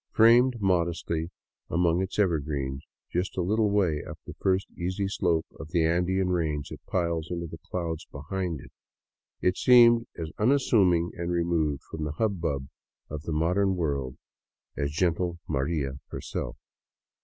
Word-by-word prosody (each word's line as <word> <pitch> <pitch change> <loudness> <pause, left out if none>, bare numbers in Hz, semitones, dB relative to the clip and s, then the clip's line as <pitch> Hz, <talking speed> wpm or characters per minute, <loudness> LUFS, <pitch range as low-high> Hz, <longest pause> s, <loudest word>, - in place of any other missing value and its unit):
Framed 120 +2 +6
modestly 85 -3 0 0.4
among 85 0 +2
its 95 0 -3
evergreens, 75 -8 0 0.3
just 90 +3 -2
a 90 - +1
little 105 +3 +2
way 90 -8 +1
up - - -8
the - - -8
first 95 0 +2
easy 95 +3 -2
slope 85 -4 +1
of 80 - -8
the 85 -1 +2
Andean 90 +3 +1
range 80 -5 -1
that - - -9
piles 85 -3 -1
into 85 -1 -3
the 80 - -9
clouds 85 -2 -4
behind 80 +1 -3
it, - - -14 0.7
it 90 - +2
seemed 120 -2 +6
as 80 -1 -4
unas 135 +6 +3
suming 90 -5 +4
and 85 0 -3
removed 85 -4 0
from 80 - -6
the 75 -1 -3
hubbub 80 -9 -1 0.4
of 75 -1 -4
the 80 - -5
modern 90 +5 +2
world 70 -7 -2 0.6
as 70 -1 -1
gentle 85 +2 0
*' - - -43
Maria 70 -2 -1
" - - -65
herself. - - -5
85 Hz, 155 wpm, -27 LUFS, 80-95 Hz, 0.7 s, Framed